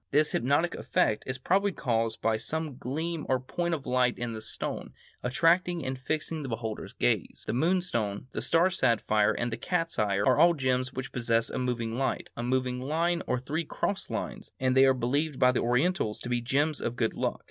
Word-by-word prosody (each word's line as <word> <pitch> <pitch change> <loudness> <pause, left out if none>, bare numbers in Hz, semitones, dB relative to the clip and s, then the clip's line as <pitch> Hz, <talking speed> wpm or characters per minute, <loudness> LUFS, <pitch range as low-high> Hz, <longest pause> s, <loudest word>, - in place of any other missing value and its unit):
This 150 +2 +3
hypnotic 145 +8 +1
effect 105 - 0
is 130 0 -2
probably 195 +9 +2
caused 115 -7 -1
by 115 -1 +3
some 155 +4 -2
gleam 160 +6 -3
or 130 -1 +3
point 170 +6 -2
of 140 - -8
light 125 -1 +2
in 120 -1 -3
the 110 - -6
stone, - - -5 0.3
attracting 170 +6 +2
and 130 - -2
fixing 155 +4 -3
the 135 - -5
beholder's 115 -1 -4
gaze. - - -1
The - - -2
moonstone, 125 - 0
the - - -3
star 170 +3 +3
sapphire, 110 - +2
and 120 +2 -2
the - - -3
cat's 165 -6 -1
eye 105 -2 +2
are 110 +6 +3
all 170 0 +6
gems 130 -2 0
which 130 0 -5
possess 115 -2 +1
a - - -2
moving 120 -2 -2
light, 135 - -2
a - - -4
moving 125 0 0
line, 165 +5 0
or 125 - +1
three 150 +6 -2
crossed 190 +5 -2
lines, - - -5
and 130 0 +1
they 135 0 +7
are 135 - +4
believed 140 +4 0
by 125 - +5
the 125 - 0
Orientals 125 - +1
to 125 - -5
be 120 -1 0
gems 145 +5 0
of 120 - -2
good 115 -3 0
luck. - - -2
130 Hz, 200 wpm, -29 LUFS, 120-160 Hz, 0.3 s, they